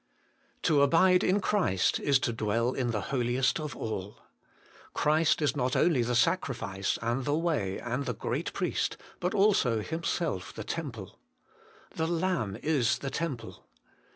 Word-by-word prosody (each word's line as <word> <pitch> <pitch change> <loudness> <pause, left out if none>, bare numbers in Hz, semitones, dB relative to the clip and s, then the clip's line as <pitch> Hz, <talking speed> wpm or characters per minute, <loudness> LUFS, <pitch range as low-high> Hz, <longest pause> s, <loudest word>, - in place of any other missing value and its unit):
1. - - -45 0.6
To 150 -3 +4
abide 180 +6 +5
in 190 +3 +3
Christ 185 - +1
is 140 -1 +3
to 120 -3 -1
dwell 115 +2 0
in 125 -2 -1
the 105 -5 -3
Holiest 125 +3 +1
of 150 -1 -5
all. 105 -2 -5 0.8
Christ 155 +1 +2
is 145 - +1
not 125 +1 0
only 160 -8 +3
the 120 +1 0
Sacrifice, 120 - 0
and 120 +3 0
the 145 +3 0
Way, 150 - -1
and 125 +3 -3
the 125 - -2
Great - - -3
Priest, - - -1 0.2
but 180 +4 -1
also 195 - +3
Himself 160 - -2
the 110 - -5
Temple. 115 - -6 0.4
' - - -27
The 160 - 0
Lamb 165 - -1
is 145 -7 +2
the 135 - -5
Temple. 150 -8 -4
135 Hz, 155 wpm, -29 LUFS, 115-165 Hz, 0.8 s, abide